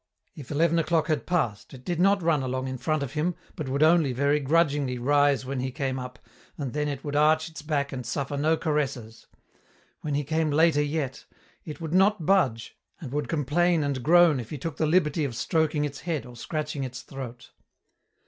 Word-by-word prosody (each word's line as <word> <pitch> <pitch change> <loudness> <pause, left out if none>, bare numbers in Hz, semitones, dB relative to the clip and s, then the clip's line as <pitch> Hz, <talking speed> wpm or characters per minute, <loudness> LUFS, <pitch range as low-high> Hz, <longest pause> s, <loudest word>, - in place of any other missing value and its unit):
If 140 -4 -10
eleven 165 +3 +2
o'clock 165 0 +1
had 155 -2 -1
passed 140 - -1
it 130 - -14
did 175 -2 -2
not 195 0 +3
run 160 -4 +2
along 130 0 -2
in 130 -1 -5
front 155 +3 0
of 135 -1 -6
him, 160 +3 -1 0.2
but 150 -4 -5
would 140 +3 +1
only, 160 -4 +4
very 140 +3 +2
grudgingly, 145 -3 +1
rise 145 +1 +2
when 135 0 -3
he 130 +1 -2
came 130 -1 -3
up, 125 -2 -7 0.4
and 140 -5 -4
then 150 0 -1
it 140 -2 -4
would 145 -1 -4
arch 155 +2 +3
its 160 - -9
back 145 -2 -1
and 130 -1 -4
suffer 140 +4 -3
no 155 +3 +2
caresses. 135 -8 -3 0.7
When 150 -2 -2
he 145 - 0
came 160 +2 0
later 155 0 +3
yet, 145 -3 -3 0.4
it 155 0 -7
would 165 -1 -5
not 190 -2 +3
budge, 140 -13 +1 0.2
and 140 -7 -8
would 145 +1 -2
complain 165 +2 +1
and 140 -3 -2
groan 165 0 +5
if 115 - -7
he 150 - -5
took 150 +2 -5
the 155 - +1
liberty 155 -2 +2
of 130 -5 -3
stroking 150 +4 0
its 140 -1 -6
head 165 -6 -3
or 125 0 -12
scratching 150 +2 -4
its 125 -2 -6
throat. 130 -3 -9
145 Hz, 205 wpm, -26 LUFS, 130-160 Hz, 0.7 s, groan